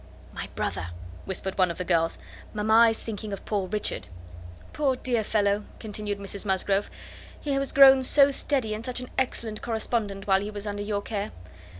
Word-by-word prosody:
"My - - -6
brother," 85 - -2 0.4
whispered 190 0 -3
one 185 -1 +4
of 170 - -5
the 180 - -3
girls; 165 -2 +1 0.4
"mamma 220 +2 +5
is 225 - -3
thinking 215 -1 -5
of 200 - -6
poor 200 -3 -1
Richard." 210 +2 -2 0.7
"Poor 275 -3 +1
dear 245 -3 0
fellow!" 205 -1 +1
continued 210 -1 -4
Mrs 200 0 -3
Musgrove; 195 0 0 0.5
"he 285 -2 -2
was 275 -1 -1
grown 270 -1 +8
so 280 +2 +5
steady, 265 -5 +1
and 215 +1 -5
such 250 +1 -2
an 250 - -8
excellent 230 -4 -2
correspondent, 220 -3 -2
while 195 -1 +3
he 205 - -4
was 205 -1 -5
under 205 -1 -3
your 205 -1 -2
care! 205 -1 -3
210 Hz, 180 wpm, -26 LUFS, 200-235 Hz, 0.7 s, grown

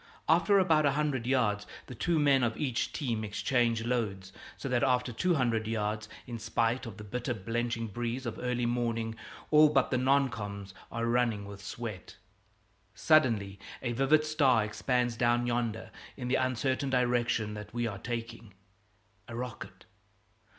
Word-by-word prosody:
After 170 +5 +4
about 160 -6 +4
a 140 - +2
hundred 140 -5 -1
yards, 105 -6 +1 0.2
the - - -9
two 170 +8 0
men 140 -3 +4
of 115 -2 0
each 130 -5 -1
team 120 -8 -2
exchange 115 +2 +1
loads, 100 -6 -2 0.2
so - - -5
that 125 -2 +1
after 125 -2 +1
two 175 +9 +1
hundred 115 -5 +1
yards, 105 -1 -2 0.2
in 120 -1 -6
spite 115 +3 0
of 110 - -9
the 105 - -8
bitter 125 +3 -3
blenching 115 +3 -2
breeze 120 +4 -4
of 115 - -4
early 125 -1 -1
morning, 115 -2 -1 0.4
all 155 0 +7
but 135 -3 +2
the 130 - +2
non 135 +1 +3
coms. 100 -3 -6 0.2
are 115 0 -2
running 115 -3 +1
with 100 0 -10
sweat. 105 -1 -7 0.8
Suddenly 110 -11 +3 0.2
a 120 - -1
vivid 135 +5 +3
star 140 -7 +3
expands 120 +2 0
down 120 0 +2
yonder 120 -2 -2 0.3
in 125 -2 -4
the - - 0
uncertain 130 +2 0
direction 120 -4 +1
that 105 0 -8
we 120 +1 -1
are 100 -4 -4
taking 115 -3 -6 0.7
a 115 - -7
rocket. 125 -1 -7
120 Hz, 160 wpm, -30 LUFS, 110-130 Hz, 0.8 s, all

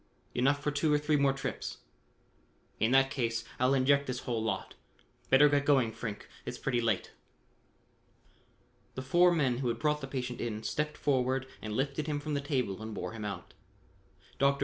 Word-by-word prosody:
"Enough 140 +3 +2
for 150 - +1
two 145 +1 +1
or 150 - +5
three 150 +1 +1
more 140 -1 +4
trips." 135 0 -4 1.0
"In 110 - +3
that 135 +1 +4
case, 115 -5 -1 0.2
I'll 130 +2 +4
inject 140 +2 +3
this 125 -1 -3
whole 115 -3 -2
lot. 110 - -2 0.6
Better 135 +3 +7
get 145 -1 +2
going, 135 -6 +3
Frink, 110 -2 -6 0.2
it's - - -5
pretty 125 -3 0
late." 110 -5 0 1.8
The 130 - -4
four 175 +7 +5
men 135 -7 +1
who 130 - -1
had 115 -1 0
brought 150 +4 0
the 135 - -5
patient 125 -2 -4
in 110 -2 -3
stepped 150 +4 -2
forward 130 -2 +1 0.2
and 110 -1 -4
lifted 140 +3 -1
him 150 -1 -1
from 150 +1 -4
the 140 - 0
table 125 -8 -1
and 110 -1 -6
bore - - -4
him 110 -1 -7
out. 100 -4 -6 0.9
Dr. 140 0 +3
135 Hz, 180 wpm, -31 LUFS, 120-145 Hz, 1.8 s, Better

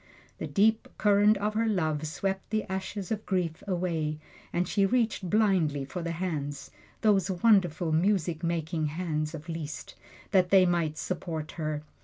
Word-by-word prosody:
The - - -3
deep 220 +2 +2
current 205 0 +4
of 210 +2 -1
her 225 +1 +1
love 155 -7 0
swept 190 +5 -3
the 215 0 0
ashes 190 0 -5
of 215 -1 -2
grief 180 -4 -1
away, 170 -5 -1 0.3
and 175 0 0
she 200 +1 +1
reached 220 -3 +1
blindly 180 -10 +2
for 180 +6 -5
the 170 0 -3
hands 150 -5 -4 0.3
those 200 -4 +3
wonderful 180 -4 +3
music 170 -1 +1
making 165 -1 -1
hands 155 -1 -2
of 155 +1 -9
Liszt 160 -3 -6 0.4
that 185 -3 +4
they 190 -1 +6
might 170 -3 0
support 165 -3 -4
her. 155 -2 -3
180 Hz, 155 wpm, -28 LUFS, 155-200 Hz, 0.4 s, they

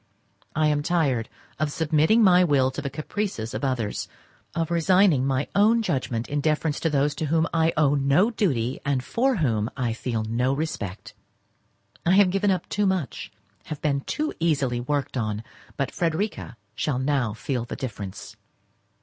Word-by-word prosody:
I 155 - +2
am 150 -1 +2
tired 145 -8 0 0.3
of 155 -1 0
submitting 160 +9 +3
my 180 -2 +6
will 135 -6 +3
to 130 - -5
the 140 - -3
caprices 155 - -4
of - - -4
others; 125 -6 -1 0.5
of 165 0 -1
resigning 170 -4 +4
my 135 +1 0
own 220 +3 +4
judgment 120 - -2
in 145 0 -1
deference 155 0 0
to 165 - 0
those 145 0 +1
to 155 +2 -3
whom 160 +2 +2
I 165 0 +3
owe 145 -2 +4
no 145 - +3
duty, 130 - 0
and 140 -2 0
for 260 - +1
whom 115 - 0
I 120 -4 0
feel 115 -1 -2
no 120 +4 0
respect. 140 - -4 0.9
I 175 - +3
have 195 -2 +5
given 195 +2 +1
up 185 -3 0
too 205 -1 0
much, 185 -7 -2 0.3
have 155 -3 -6
been 140 -2 +1
too 305 - -2
easily 140 -7 +1
worked 140 +1 -2
on, 110 -2 -2 0.3
but 140 - -1
Frederica 165 - -2 0.2
shall 135 +3 -1
now 130 -4 0
feel 125 0 -3
the - - -6
difference. 100 -7 -7
145 Hz, 165 wpm, -25 LUFS, 130-170 Hz, 0.9 s, my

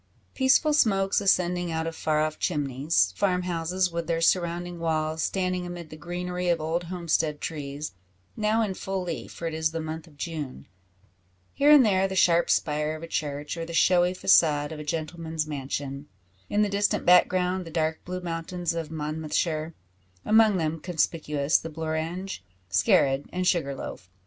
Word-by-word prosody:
Peaceful 275 +3 +3
smokes 195 -9 +3
ascending 180 -3 +1
out 160 0 -2
of 165 0 -4
far 155 -1 0
off 155 0 -2
chimneys; 135 - +1
farm 180 -2 +1
houses, 180 +1 -1
with 170 -1 -3
their 165 -1 0
surrounding 175 0 0
walls, 160 -1 -1
standing 185 0 -1
amid 175 -2 -7
the - - -7
greenery 180 +2 -3
of 170 -1 +2
old 165 +3 -2
homestead 165 -4 -1
trees 145 -1 -5 0.4
now 220 +1 +1
in 200 -3 -2
full 190 0 -3
leaf, 170 -3 -5
for 170 - -7
it 165 - -2
is 160 0 0
the 165 +1 -4
month 160 +1 -6
of 150 -3 -19
June 150 -4 -5 0.9
here 285 +1 +3
and 295 -4 +8
there 195 -2 +3
the 190 - -5
sharp 170 -2 +4
spire 150 0 +1
of 155 - -9
a - - -6
church, 145 -1 -3
or 165 - -3
the 170 0 -7
showy 180 0 +4
facade 150 -6 +4
of 155 - -6
a - - -5
gentleman's 160 0 -3
mansion 140 -1 -5 0.4
in 210 +1 +2
the - - +2
distant 200 +1 0
background, 180 +1 +4
the 165 - -9
dark 160 0 -1
blue 185 0 -5
mountains 170 0 -3
of 165 -2 -4
Monmouthshire; 155 +1 -2 0.5
among 215 -2 +5
them 160 -1 -1
conspicuous 155 -3 0
the 165 - -7
Blorenge, 160 - -4 0.3
Skerrid, 140 -10 +3
and 185 0 -2
Sugar 155 -7 +1
Loaf. 90 -7 -8
165 Hz, 170 wpm, -26 LUFS, 155-180 Hz, 0.9 s, and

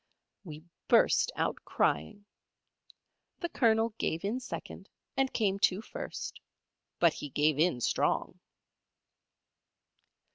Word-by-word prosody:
We 155 -4 -9 0.2
burst - - +4
out - - -1
crying. 80 - -1 1.2
The 345 - -2
Colonel 225 -5 +3
gave 165 +4 -1
in 225 +6 -1
second, 255 - -8 0.3
and 270 -1 +1
came 200 -3 0
to 190 -1 +3
first; - - -6 0.6
but 170 -2 +4
he 145 - -7
gave 150 +1 +1
in 160 -7 +2
strong. - - 0
190 Hz, 105 wpm, -31 LUFS, 155-225 Hz, 1.2 s, burst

